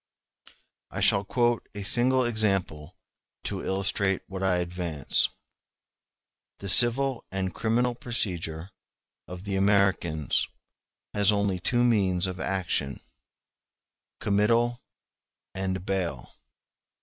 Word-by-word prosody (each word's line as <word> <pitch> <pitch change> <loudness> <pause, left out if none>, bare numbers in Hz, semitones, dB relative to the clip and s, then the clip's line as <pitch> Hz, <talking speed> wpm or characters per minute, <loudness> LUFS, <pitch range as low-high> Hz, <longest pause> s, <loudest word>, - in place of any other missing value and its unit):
I - - -6
shall 100 - +3
quote 120 +3 0
a 100 - -5
single 125 +4 +2
example 95 -8 -1 0.5
to - - -4
illustrate 95 0 0
what 95 -1 -7
I 95 -1 +2
advance. 85 -5 0 1.3
The 100 - -6
civil 125 +4 +6
and 95 -1 -3
criminal 120 +2 0
procedure 90 -8 -4 0.6
of 90 0 -9
the 100 -1 -3
Americans 95 -7 +1 0.7
has 105 0 +4
only 100 -3 0
two 120 +7 +1
means 95 -7 +2
of 90 -1 -4
action—committal 105 - -3 0.7
and 95 -1 -3
bail. 95 -3 -3
95 Hz, 95 wpm, -27 LUFS, 90-115 Hz, 1.3 s, civil